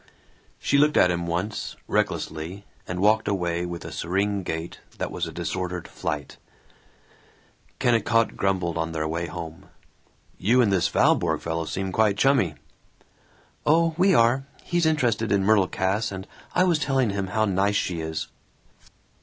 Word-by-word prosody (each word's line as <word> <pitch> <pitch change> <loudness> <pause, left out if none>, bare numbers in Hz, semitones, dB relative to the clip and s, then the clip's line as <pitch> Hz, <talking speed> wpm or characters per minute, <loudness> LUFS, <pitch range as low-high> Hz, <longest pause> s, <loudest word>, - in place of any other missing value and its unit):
She 140 - +2
looked 150 +1 +4
at 90 - +5
him 85 0 -2
once, 90 +6 -3
recklessly, 85 +6 -2 0.2
and 90 0 -4
walked 110 +2 +3
away 90 -3 -1
with 85 -1 -6
a - - -6
serene 100 +3 -1
gait 80 -1 -5 0.2
that - - -3
was - - -3
a - - -6
disordered 90 -2 -4
flight. 75 -5 -5 1.4
Kennicott 115 -1 +2
grumbled 90 -4 0
on 80 0 -2
their 80 -1 -1
way 85 +2 -2
home, 80 0 -8 0.7
"You 120 +7 +3
and 115 -5 +4
this 90 -3 +3
Valborg - - +2
fellow 80 0 -2
seem 95 +6 -3
quite 105 0 +2
chummy." 125 - +3 1.1
"Oh, 165 +2 +3
we 185 +1 +4
are. 125 +3 +3 0.2
He's 175 -2 +1
interested 120 -8 +1
in 100 -1 +3
Myrtle 100 -3 +4
Cass, 95 +5 -1
and 95 -1 -6 0.3
I 180 - +5
was 175 -4 +2
telling 135 -6 +1
him 100 -1 -2
how 110 +4 +1
nice 100 +1 +1
she 90 -4 -1
is." 80 0 -4
95 Hz, 155 wpm, -25 LUFS, 85-115 Hz, 1.4 s, at